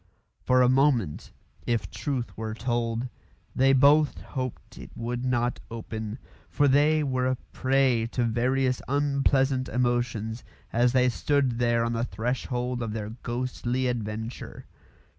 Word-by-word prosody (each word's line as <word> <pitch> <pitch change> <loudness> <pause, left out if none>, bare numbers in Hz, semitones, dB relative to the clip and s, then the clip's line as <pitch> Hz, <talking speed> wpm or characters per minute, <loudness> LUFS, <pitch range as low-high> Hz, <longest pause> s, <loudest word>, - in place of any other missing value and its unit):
For 125 0 +4
a - - +5
moment, 130 - +2 0.4
if 110 -6 -1
truth 130 -5 -3
were 110 0 -4
told, 120 0 -1 0.5
they 135 +1 +4
both 145 +3 +4
hoped 130 -3 -6
it - - -9
would 120 +2 -3
not 125 -1 0
open, 110 -1 -5 0.3
for 145 - +2
they 150 +3 +4
were 130 -2 0
a 130 - +1 0.2
prey 130 -3 +2
to 125 - +1
various 125 +3 +1
unpleasant 135 -2 +1
emotions 120 -2 -1 0.3
as 120 +1 +3
they 125 -1 +4
stood 130 -1 0
there 120 -1 +2
on 115 - -1
the 115 0 -1
threshold 125 +1 -2
of 115 -2 -3
their 105 -1 -4
ghostly 125 +1 -2
adventure. 110 -1 -4
125 Hz, 135 wpm, -27 LUFS, 115-130 Hz, 0.5 s, a